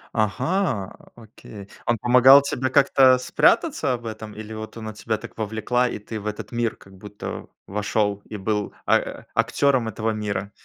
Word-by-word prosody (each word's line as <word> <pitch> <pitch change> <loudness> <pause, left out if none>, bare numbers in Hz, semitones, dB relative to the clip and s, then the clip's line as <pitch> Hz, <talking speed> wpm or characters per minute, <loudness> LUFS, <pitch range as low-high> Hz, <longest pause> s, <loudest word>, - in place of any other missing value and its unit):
Ага, 120 - 0 0.2
окей. 110 -3 -13 0.2
Он 120 - +1
помогал 125 +4 +7
тебе 130 -2 -2
как-то 135 -1 +5
спрятаться 125 0 +2
в 120 -1 -10
этом, 110 -1 -7
или 110 0 -8
вот 110 0 -8
она 110 -1 -7
тебя 110 +1 -3
так - - -11
вовлекла, 110 +3 0
и 120 - -5
ты 110 +1 -7
в 105 - -7
этот 105 0 -6
мир 120 -2 -1
как 95 0 -17
будто 105 +2 -8 0.2
вошёл 105 0 -1
и - - -9
был 105 +1 -2
а - - 0
актёром 130 -5 +2
этого 110 0 -2
мира? 100 -2 -3
110 Hz, 165 wpm, -23 LUFS, 105-125 Hz, 0.2 s, помогал